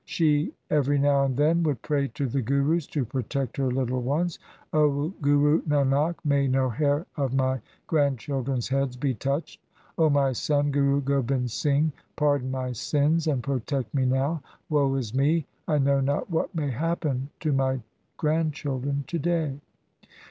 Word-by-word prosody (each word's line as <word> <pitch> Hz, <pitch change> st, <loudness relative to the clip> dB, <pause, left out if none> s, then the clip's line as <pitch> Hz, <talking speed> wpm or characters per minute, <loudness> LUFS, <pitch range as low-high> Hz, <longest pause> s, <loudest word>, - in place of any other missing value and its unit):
She 150 Hz, -3 st, +1 dB, 0.2 s
every 145 Hz, -1 st, +2 dB
now 140 Hz, 0 st, +3 dB
and 130 Hz, 0 st, -2 dB
again 160 Hz, +3 st, +3 dB
would 150 Hz, -8 st, -1 dB
pray 145 Hz, -2 st, 0 dB
to 140 Hz, -, -1 dB
the 135 Hz, +2 st, -1 dB
Gurus 140 Hz, +6 st, +1 dB
to 140 Hz, -5 st, -2 dB
protect 130 Hz, +1 st, -3 dB
her 135 Hz, -2 st, +1 dB
little 125 Hz, 0 st, -1 dB
ones: 155 Hz, +7 st, -1 dB, 0.2 s
' -, -, -32 dB
O 150 Hz, 0 st, +2 dB
Guru 145 Hz, +2 st, +4 dB
Nanak, 145 Hz, +2 st, +2 dB
may 140 Hz, -1 st, +3 dB
no 130 Hz, 0 st, +2 dB
hair 145 Hz, -, +1 dB
of 135 Hz, -3 st, 0 dB
my 130 Hz, -1 st, +1 dB, 0.2 s
grandchildren's 135 Hz, -3 st, 0 dB
heads 135 Hz, -2 st, 0 dB
be 135 Hz, 0 st, 0 dB
touched! 140 Hz, +7 st, -3 dB, 0.4 s
O 160 Hz, -1 st, +5 dB
my 140 Hz, -2 st, +3 dB
son, 145 Hz, +3 st, +1 dB
Guru 140 Hz, 0 st, +2 dB
Gobind 135 Hz, -2 st, 0 dB
Singh, 145 Hz, +5 st, +1 dB, 0.2 s
pardon 145 Hz, -4 st, +1 dB
my 130 Hz, -1 st, -2 dB
sins 150 Hz, +6 st, +1 dB
and 135 Hz, -5 st, 0 dB
protect 135 Hz, -3 st, -2 dB
me 130 Hz, -2 st, +1 dB
now! 135 Hz, +5 st, +1 dB, 0.3 s
Woe 140 Hz, -2 st, +3 dB
is 120 Hz, -5 st, -3 dB
me! 145 Hz, +4 st, +2 dB, 0.2 s
I 150 Hz, -, +2 dB
know 140 Hz, 0 st, +3 dB
not 140 Hz, +6 st, -1 dB
what 165 Hz, +3 st, -1 dB
may 145 Hz, -4 st, -1 dB
happen 145 Hz, -1 st, -1 dB
to 155 Hz, -, 0 dB
my 130 Hz, -1 st, +1 dB, 0.4 s
grandchildren 145 Hz, -3 st, -1 dB
to 170 Hz, -, -3 dB
day.' 155 Hz, -3 st, -1 dB
140 Hz, 160 wpm, -26 LUFS, 130-150 Hz, 0.4 s, O